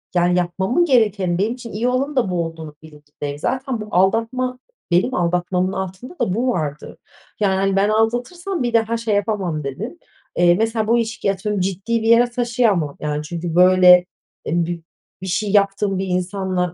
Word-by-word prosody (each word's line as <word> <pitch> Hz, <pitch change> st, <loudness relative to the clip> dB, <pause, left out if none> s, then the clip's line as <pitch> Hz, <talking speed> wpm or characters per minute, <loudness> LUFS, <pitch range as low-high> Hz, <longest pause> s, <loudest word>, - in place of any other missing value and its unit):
yani, 175 Hz, 0 st, +3 dB
yapmamın 190 Hz, -, +1 dB
gerekeni 210 Hz, -, +2 dB
benim 210 Hz, +5 st, 0 dB
için 245 Hz, -2 st, -10 dB
iyi 225 Hz, +4 st, -1 dB
olanın 270 Hz, +4 st, -1 dB
da 245 Hz, -7 st, +1 dB
bu 170 Hz, -2 st, 0 dB
olduğunun 160 Hz, -2 st, -8 dB
bilincindeyim. 145 Hz, -2 st, -8 dB
Zaten 260 Hz, -, -2 dB
bu 210 Hz, -, -7 dB
aldatma, 230 Hz, +7 st, +1 dB, 0.3 s
benim 185 Hz, +9 st, +2 dB
aldatmamın 180 Hz, +1 st, 0 dB
altında 190 Hz, -, -6 dB
da 230 Hz, -7 st, 0 dB
bu 240 Hz, +6 st, 0 dB
vardı. 155 Hz, -, -3 dB, 0.4 s
Yani, 200 Hz, -3 st, +2 dB
hani, 195 Hz, 0 st, +1 dB
ben 200 Hz, +1 st, +2 dB
aldatırsam 245 Hz, -, -1 dB
bir 240 Hz, -1 st, -2 dB
daha 230 Hz, 0 st, +2 dB
şey 225 Hz, -2 st, -1 dB
yapamam 195 Hz, -7 st, -1 dB
dedim. 185 Hz, -, -6 dB, 0.4 s
Eee, 175 Hz, 0 st, +4 dB
mesela, 225 Hz, +1 st, 0 dB
bu 235 Hz, +2 st, +3 dB
ilişkiyi 220 Hz, -3 st, -1 dB
atıyorum, 200 Hz, +1 st, -3 dB
ciddi 195 Hz, +5 st, -1 dB
bir 225 Hz, -, -2 dB
yere 235 Hz, +1 st, +5 dB
taşıyamam, 235 Hz, -, 0 dB
yani, 150 Hz, 0 st, -3 dB
çünkü, 165 Hz, +1 st, -5 dB
böyle, 180 Hz, 0 st, +7 dB, 0.4 s
eb 170 Hz, +1 st, 0 dB, 0.5 s
bir 190 Hz, -, -6 dB
şey 195 Hz, +3 st, -1 dB
yaptığım 200 Hz, -1 st, +2 dB
bir 190 Hz, +1 st, -2 dB
insanla 180 Hz, -1 st, -1 dB
195 Hz, 170 wpm, -20 LUFS, 175-230 Hz, 0.5 s, böyle